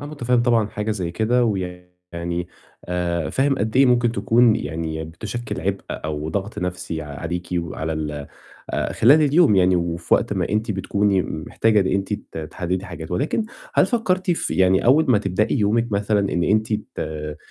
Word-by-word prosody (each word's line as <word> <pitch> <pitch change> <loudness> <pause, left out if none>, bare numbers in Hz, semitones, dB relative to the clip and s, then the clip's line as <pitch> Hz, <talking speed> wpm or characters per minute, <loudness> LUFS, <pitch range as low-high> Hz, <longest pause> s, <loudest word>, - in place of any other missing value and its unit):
أنا 145 - -6
مُتفهِّم 125 -5 0
طبعًا 115 -3 +3
حاجة 105 +1 -3
زي 95 -6 -2
كده 115 +7 +1
ويعني 90 -3 -4 0.4
آآ 85 -2 -2
فاهم 135 0 +1
قد 110 +3 -1
إيه 135 +1 +6
ممكن 120 -2 +3
تكون 115 +2 +4
يعني 80 +1 -4
بتُشكِّل 100 +9 -6
عِبء - - -1
أو 75 0 -4
ضَغْط 100 +6 -3
نَفْسي 90 -3 -4
عليكِ 80 +4 -5
وعلى 80 -1 -3
ال 75 -2 -4 0.4
آآ - - -1
خلال 145 +7 +5
اليوم 150 - +4
يعني 90 -1 +4
وفي 85 -1 0
وقت - - 0
ما - - -1
أنتِ 105 +2 -1
بتكوني 100 0 +1
م 80 -2 -5
محتاجة 110 -2 +3
إن 95 - +1
أنتِ 95 +2 -1 0.2
ت - - -5
تحدّدي 90 +4 -3
حاجات 85 -3 -8
ولكن 145 - 0 0.3
هل - - +5
فكّرتِ 185 -6 0
في 170 - -1
يعني 95 0 +3
أول 145 +6 +5
ما 115 - +5
تبدئي 100 +6 0
يومِك 115 +2 +1
مثلًا 100 0 +1
إن 85 - +1
أنتِ 110 +2 +1
ت 75 -7 -4
95 Hz, 175 wpm, -22 LUFS, 85-115 Hz, 0.4 s, إيه